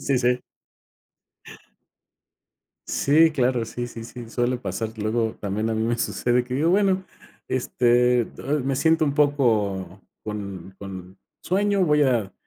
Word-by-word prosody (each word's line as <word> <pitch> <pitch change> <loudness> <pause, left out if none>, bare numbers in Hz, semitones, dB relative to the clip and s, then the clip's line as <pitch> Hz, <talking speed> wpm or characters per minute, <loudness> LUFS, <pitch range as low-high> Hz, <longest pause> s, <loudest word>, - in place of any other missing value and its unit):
Sí, 135 -3 +1
sí. 125 0 +1 2.5
Sí, 160 +3 +4
claro. 125 -4 +1
Sí, 120 +2 -5
sí, 115 -1 -9
sí, 120 -1 -9
suele 120 +1 0
pasar. 110 +2 -4
Luego 110 +1 -1
también 105 +2 -2
a - - 0
mí 110 - -1
me 120 +1 0
sucede, 120 +1 0
que 125 +1 -5
digo: 160 +5 +2
"Bueno, 190 -1 +2 0.4
este 125 -1 +2
do 145 +5 -3
me 135 +1 -1
siento 160 +2 +3
un 140 - -1
poco 105 -11 +1 0.2
con 100 -3 -6
con 95 -1 -9 0.2
sueño, 200 0 +1
voy 150 -2 +3
a 120 -8 +1
120 Hz, 140 wpm, -24 LUFS, 110-140 Hz, 2.5 s, Sí